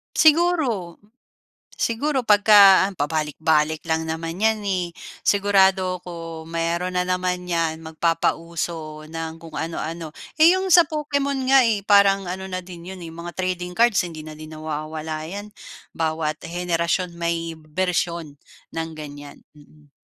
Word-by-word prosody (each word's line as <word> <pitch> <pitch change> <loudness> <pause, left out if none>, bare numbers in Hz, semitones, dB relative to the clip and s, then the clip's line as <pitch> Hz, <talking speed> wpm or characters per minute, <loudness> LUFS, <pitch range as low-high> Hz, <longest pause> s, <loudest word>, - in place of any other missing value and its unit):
Siguro 305 - +3 0.8
siguro, 265 +3 0
'pagka 205 -2 +7
an 200 - -9
pabalik-balik 155 +1 0
lang 160 0 -1
naman 165 +2 -4
'yan 220 0 +2
eh. 185 -3 -1 0.4
Sigurado 190 -2 +3
ako 165 -2 -8
mayroon 170 +2 -2
na 180 - +2
naman 180 0 -2
'yan, 165 -1 -1
magpapauso 165 -1 -2
ng 165 0 -6
kung 165 - -8
anu-ano. 160 -1 -5 0.2
Yung 370 +4 +5
sa 345 -2 +7
Pokemon 280 -3 -1
nga 270 -2 +6
eh, 215 -3 +1
parang 195 -2 +4
ano 190 +1 -5
na 185 -1 -4
din 175 -1 -11
'yon 185 - -11
eh, 165 - -7
mga 170 +1 -8
trading 180 -1 -3
cards, 235 -1 +4
hindi 160 -3 -8
na 155 0 -10
din 155 0 -9
nawawala 155 0 -5
'yan, 205 +5 -7 0.4
bawat 160 -1 -2
henerasyon 175 +1 -1
may 165 -1 -2
bersiyon 170 -1 -2 0.3
ng 165 0 -4
ganyan. 145 -2 -10
Mm. 150 0 -21
170 Hz, 135 wpm, -23 LUFS, 160-195 Hz, 0.8 s, pagka